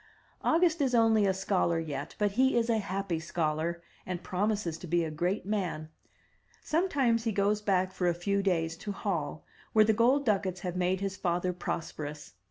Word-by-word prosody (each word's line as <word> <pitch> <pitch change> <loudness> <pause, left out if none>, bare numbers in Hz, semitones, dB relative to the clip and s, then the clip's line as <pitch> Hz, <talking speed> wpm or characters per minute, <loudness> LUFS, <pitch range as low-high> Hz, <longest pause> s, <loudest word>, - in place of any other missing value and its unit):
August 335 -1 +3
is 260 -3 +2
only 225 -3 +4
a - - +4
scholar 190 -3 +1
yet, 145 -3 -5
but 205 -1 +1
he 260 +4 +3
is 235 0 +2
a 225 - +2
happy 195 -4 -2
scholar, 165 +1 -2 0.2
and 180 -1 -5
promises 190 -3 -1
to 180 - -8
be 170 +1 +2
a 160 - -3
great 175 +6 -1
man. 185 -7 -2 0.7
Sometimes 275 -9 +1
he 225 - +1
goes 205 +1 +1
back 190 -2 +1
for 185 -1 -1
a 175 - +2
few 200 +3 0
days 165 -4 0
to 205 +4 -5
Hall, 165 -7 -3 0.3
where 215 -1 +6
the 220 - +3
gold 255 +6 +3
ducats 190 -4 0
have 180 -1 -4
made 180 +1 0
his 195 -1 -3
father 180 0 0
prosperous. 150 - -5
190 Hz, 180 wpm, -30 LUFS, 170-215 Hz, 0.7 s, where